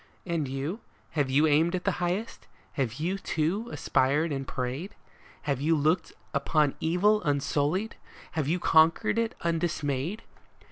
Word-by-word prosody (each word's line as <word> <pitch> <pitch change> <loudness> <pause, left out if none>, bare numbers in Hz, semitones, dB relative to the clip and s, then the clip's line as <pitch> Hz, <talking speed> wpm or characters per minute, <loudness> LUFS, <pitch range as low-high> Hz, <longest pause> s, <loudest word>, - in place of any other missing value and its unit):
And 165 -5 -1
you? 135 - -3 0.3
Have 145 -4 0
you 145 +4 +4
aimed 160 +4 +3
at 180 - -3
the 195 -3 0
highest? 180 +6 -2 0.2
Have 125 -4 -2
you, 175 +7 -2
too, 180 +8 -1
aspired 145 +5 +1
and 135 -1 -3
prayed? 135 +9 -4 0.5
Have 140 -4 -1
you 160 +3 +3
looked 160 +3 +1 0.2
upon 145 0 +2
evil 205 +6 +3
unsullied? 145 +7 0 0.3
have 155 -4 -1
you 170 +4 +1
conquered 165 +8 +4
it 230 -1 -1
undismayed 165 - -1
160 Hz, 140 wpm, -28 LUFS, 140-180 Hz, 0.5 s, you